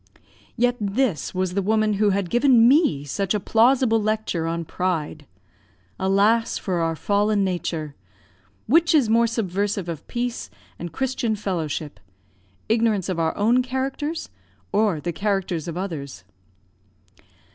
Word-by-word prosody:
Yet 245 +1 +2
this 200 - -1
was 185 -1 -1
the 200 - 0
woman 215 +1 +1
who 210 - +4
had 195 -3 -1
given 240 -2 +5
me 255 - +3
such 195 +8 -2
a - - +1
plausible 230 +2 +3
lecture 210 -6 -1
on 165 0 -3
pride. 155 -5 -3 0.7
Alas, 205 +4 +2
for 180 -3 -2
our 165 -1 0
fallen 205 +3 +1
nature! 170 -5 -3 0.7
Which 330 0 +4
is 250 -8 +3
more 230 +1 +4
subversive 205 -3 -2
of 165 -3 -6
peace 245 0 -3 0.3
and 175 0 -6
Christian 255 - -1
fellowship 165 -7 -4 0.7
ignorance 220 -4 +1
of 180 -3 -2
our 160 -1 0
own 230 +5 +3
characters, 265 - -3 0.4
or 210 -7 +2
the 170 +3 -4
characters 195 -4 -2
of 170 0 -5
others? 140 - -5
200 Hz, 135 wpm, -23 LUFS, 175-230 Hz, 0.7 s, given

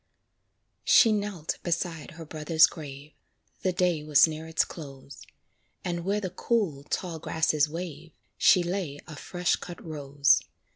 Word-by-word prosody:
She 225 - +6
knelt 200 -6 -2
beside 170 -2 -3
her 165 - -8
brother's 155 +1 +4
grave, 145 -2 -8 0.5
The 185 - +1
day 180 -3 +1
was 150 0 +5
near 160 0 -6
its 160 - +1
close; 140 -4 -11 0.6
And 175 -1 -2
where 200 +3 0
the 185 -4 -4
cool, 185 -8 -1
tall 170 -1 -3
grasses 155 -2 +1
wave, 165 -1 -7 0.2
She 180 - +5
lay 175 -5 -3
a 155 - -9
fresh 175 +4 -1
cut 175 -1 -9
rose. 145 -2 +2
160 Hz, 140 wpm, -27 LUFS, 150-180 Hz, 0.6 s, She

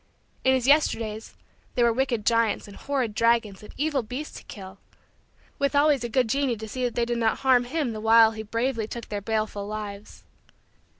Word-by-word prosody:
In 260 0 +4
his 255 -2 -1
Yesterdays, 225 -7 +1 0.4
there 240 - +3
were 235 - +3
wicked 245 -4 -1
giants 230 -3 +1
and 200 - -12
horrid 265 -6 -2
dragons 230 -3 +1
and 210 - -12
evil 290 -2 0
beasts 250 +7 -7
to - - -17
kill, 190 -1 -10 0.8
with 280 0 0
always 285 -3 +3
a 240 - -3
good 250 +1 +2
Genii 270 +1 0
to 220 +1 -7
see 255 +4 -4
that 240 - -3
they 235 - +1
did 240 0 -2
not 225 -1 0
harm 255 -2 +4
him 280 -1 -2
the 215 - -6
while 225 0 +6
he 220 -1 -6
bravely 230 +1 -2
took 235 0 -8
their 205 -1 -3
baleful 215 -1 -2
lives. 210 -1 -7
230 Hz, 195 wpm, -25 LUFS, 215-260 Hz, 0.8 s, while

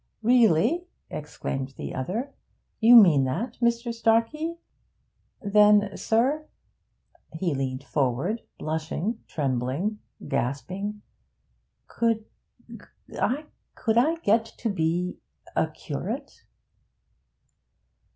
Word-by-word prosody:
'Really?' 240 - +4 0.2
exclaimed 135 -3 -5
the - - -5
other. 215 - -3 0.5
'You 235 +2 +8
mean 170 - +8
that, 170 - -3
Mr. 235 0 +1
Starkey? 230 +9 +1 0.9
Then, 205 0 +5
sir' 270 +8 +1 0.9
he 165 0 -1
leaned 130 -1 -3
forward, 140 - -1 0.2
blushing, 160 +8 -3
trembling, 140 - -1 0.3
gasping 190 +11 -3 0.8
'could 225 -2 0 0.9
I 290 +5 -1 0.8
get 225 +2 +3
to 230 - -1
be 175 0 -1 0.4
a - - +2
curate?' - - -6
205 Hz, 80 wpm, -26 LUFS, 155-230 Hz, 0.9 s, You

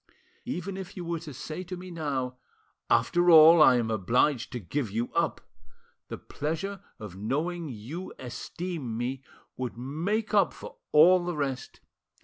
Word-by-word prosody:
Even 195 -5 -4
if 190 -1 -8
you 175 - -5
were 170 -1 -2
to 155 -2 -9
say 155 +7 -6
to 185 0 -7
me 180 0 -9
now, 135 -6 -3 0.5
'After 175 0 +3
all, 165 0 +9
I 130 -4 +8
am 115 -2 0
obliged 115 +6 +1
to 125 - -3
give 120 - -3
you 115 +4 -3
up' - - 0 0.7
the - - -6
pleasure 185 +6 -4 0.2
of 105 -4 -9
knowing 155 - -2
you 130 - -7
esteem 135 0 -5
me 125 +2 -3 0.4
would 125 -3 -4
make 170 - -2
up 200 -5 +4
for - - -11
all 175 +4 +6
the 175 -2 -3
rest. 135 -3 -4
155 Hz, 155 wpm, -28 LUFS, 125-175 Hz, 0.7 s, all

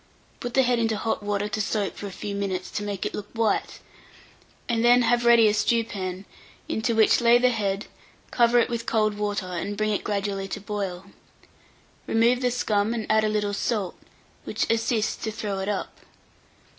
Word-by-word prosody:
Put 245 -1 -5
the 265 - +5
head 245 -1 +2
into 225 -2 +1
hot 225 0 -2
water 205 0 -1
to 215 0 -2
soak 205 -1 -1
for 205 - -6
a - - -7
few 200 +2 -5
minutes, 190 -2 -3
to - - -3
make 205 -2 -4
it - - -3
look 210 - -5
white, 225 -2 0 0.9
and 230 -2 0
then 245 +1 +6
have 240 0 +2
ready 235 -2 +7
a 210 - +3
stewpan, 200 -4 -1 0.4
into 230 +1 -1
which 220 +2 +4
lay 235 0 +6
the 250 +1 +3
head; 200 -3 -1 0.5
cover 240 0 +4
it 235 - +4
with 235 -1 -4
cold 215 -2 +2
water, 205 -2 -2
and 185 +3 -4
bring 215 0 0
it 205 - -1
gradually 200 -1 -2
to 210 - -5
boil. 195 -3 -4 1.0
Remove 235 +3 +3
the 250 - +2
scum, 220 -2 0
and 220 -2 -3
add 220 0 +4
a 215 - +2
little 210 -1 -1
salt, 205 -3 -1 0.5
which - - -2
assists 225 -1 0
to 220 - -1
throw 205 -2 -4
it 190 +1 -2
up. 205 - -3
215 Hz, 190 wpm, -25 LUFS, 200-230 Hz, 1.0 s, ready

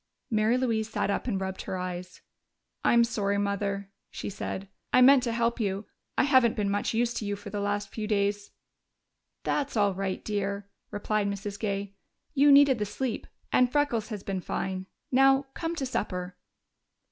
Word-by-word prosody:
Mary 220 +2 +3
Louise 225 -4 0
sat 210 - 0
up 200 - -2
and 200 -6 0
rubbed 190 0 -4
her 185 - -4
eyes. 180 0 -6 0.6
"I'm 235 0 +5
sorry, 205 -3 0
Mother," 200 -1 -2 0.2
she - - -5
said. 195 0 -5 0.2
"I - - +5
meant 265 +1 +8
to 240 -2 -1
help 235 +1 0
you. 200 -1 -1 0.3
I - - +5
haven't 260 -4 +4
been 205 -2 0
much 205 +2 -1
use 240 +1 +1
to - - -3
you 205 0 -2
for 205 0 -9
the 205 - -3
last 205 0 -1
few 215 -1 -4
days." 205 -1 0 0.9
"That's 285 -4 -1
all 205 -2 +3
right, 190 0 -3
dear," 200 -1 -2 0.2
replied 205 0 -1
Mrs. 200 0 -4
Gay. 200 -2 -2 0.4
"You 290 0 +6
needed 280 -3 +7
the 210 - 0
sleep, 250 +2 -3 0.2
and 250 -1 +4
Freckles 265 -7 +1
has 210 -4 -5
been 190 -2 -3
fine.... 190 +1 -3 0.2
Now, 270 +1 +5
come 330 0 -3
to 280 - -2
supper." 180 -7 -3
210 Hz, 175 wpm, -28 LUFS, 200-240 Hz, 0.9 s, meant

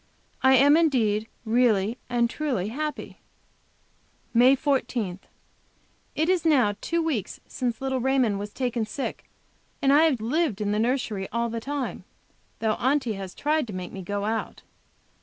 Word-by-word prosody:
I 265 0 +6
am 280 +3 +6
indeed 225 -10 +2 0.2
really 225 -1 +2
and 240 -1 +2
truly 240 -7 -2
happy. 300 +5 -5 1.1
MAY 250 +3 +6
14. 255 - -1 1.0
It 315 - +1
is 365 -2 +2
now 265 -10 +3
two 335 0 0
weeks 260 - -2
since 240 -3 -3
little 265 -1 -1
Raymond 250 -5 +1
was 205 +1 -6
taken 245 -3 -2
sick, 220 +6 -5 0.5
and 275 0 +3
I 305 +3 +6
have 285 -7 +2
lived 245 - 0
in 205 -1 -1
the 210 - 0
nursery 225 -5 -1
all 235 0 -1
the 230 - -3
time, 280 0 -4 0.5
though 220 -1 0
Aunty 260 -3 +1
has 195 -2 -7
tried 305 -2 0
to 210 - -7
make 185 -1 -6
me 195 - -7
go 200 +2 -3
out. 220 +1 -3
245 Hz, 155 wpm, -25 LUFS, 215-280 Hz, 1.1 s, I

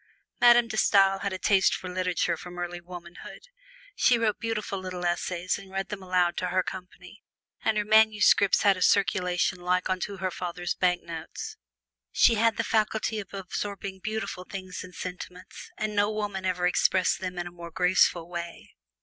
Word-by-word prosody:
Madame 240 -1 +6
De 220 -1 -5
Stael 195 -2 +4
had 200 - -2
a 185 - -3
taste 195 0 +3
for 185 - -7
literature 180 -1 0
from 180 0 -10
early 175 0 -5
womanhood. 175 0 -11 0.5
She 245 - +4
wrote 225 -2 0
beautiful 215 -4 -3
little 185 -1 -5
essays 175 +1 -1
and 195 -1 -13
read 195 0 -3
them 210 -2 -6
aloud 180 -2 +1
to 180 - -1
her 185 +1 +1
company, 180 +2 -9 0.4
and 220 -1 +1
her 210 - 0
manuscripts 215 -2 +4
had 200 -2 +5
a - - -7
circulation 180 -1 +2
like 180 +1 0
unto 190 +2 -3
her 185 0 -2
father's 175 0 -4
bank 180 -1 +1
notes. 165 -1 -7 0.6
She - - +5
had 225 0 +2
the - - 0
faculty 220 0 0
of 200 - -8
absorbing 195 0 -5
beautiful 215 -2 -4
thoughts 185 -1 -7
and 180 -1 -12
sentiments, 180 0 -8
and 215 -1 -3
no 205 +1 +2
woman 205 -3 -3
ever 180 -1 0
expressed 185 +1 +2
them 185 -1 -5
in 175 - -3
a 175 - -7
more 170 -1 -9
graceful 180 -1 +2
way. 170 -1 -7
185 Hz, 175 wpm, -27 LUFS, 180-205 Hz, 0.6 s, Madame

